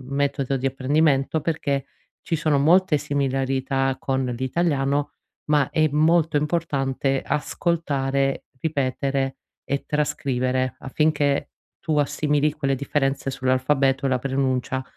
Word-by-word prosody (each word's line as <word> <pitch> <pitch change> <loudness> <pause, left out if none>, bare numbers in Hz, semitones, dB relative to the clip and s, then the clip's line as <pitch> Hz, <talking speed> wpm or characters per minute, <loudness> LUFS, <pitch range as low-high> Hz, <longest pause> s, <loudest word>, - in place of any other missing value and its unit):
metodo 140 -1 0
di 135 0 -3
apprendimento, 140 +2 +1
perché 140 -3 -1 0.4
ci 165 - -2
sono 155 -2 +2
molte 170 +2 +4
similarità 135 -1 -1
con 130 -1 -1
l'italiano, 135 +3 0 0.3
ma 150 -3 +2
è 155 0 +2
molto 155 +1 +3
importante 140 -4 0
ascoltare, 140 -4 -1 0.2
ripetere 135 -2 -1 0.3
e 140 0 -2
trascrivere, 130 -4 -1
affinché 145 0 0 0.3
tu 155 -3 -1
assimili 150 +1 +1
quelle 135 -2 -1
differenze 135 0 -1
sull'alfabeto 135 +1 +1
e 135 - +2
la 130 -1 +1
pronuncia 130 -1 -1
140 Hz, 110 wpm, -23 LUFS, 135-150 Hz, 0.4 s, molte